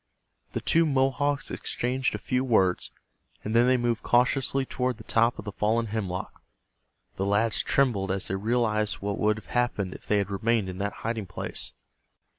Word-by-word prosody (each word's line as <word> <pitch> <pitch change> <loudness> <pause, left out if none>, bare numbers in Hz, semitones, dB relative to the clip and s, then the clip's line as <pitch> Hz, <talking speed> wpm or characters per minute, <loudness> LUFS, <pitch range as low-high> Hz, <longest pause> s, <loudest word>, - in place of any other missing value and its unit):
The - - -2
two 165 0 +3
Mohawks 140 +1 +1
exchanged 125 +2 -1
a - - -2
few 125 0 -1
words, 95 -8 +2 0.5
and 110 +2 -2
then 120 +1 +5
they 130 0 +4
moved 120 -1 0
cautiously 135 +2 +2
toward 125 -2 -2
the 110 - -11
top 115 +2 +2
of - - -8
the 105 - -4
fallen 110 +3 +1
hemlock. 100 -4 -4 0.8
The 95 - -1
lads 105 +2 +2
trembled 115 -8 +1
as 95 0 -2
they 95 - -1
realized 110 0 +1
what 100 0 -4
would 105 0 +2
have 110 - -10
happened 115 -6 0
if - - -12
they 105 - +3
had 100 -1 -1
remained 110 0 +1
in 90 +1 -7
that 100 +1 -1
hiding 115 -3 -2
place. 95 - -4
115 Hz, 180 wpm, -27 LUFS, 100-125 Hz, 0.8 s, then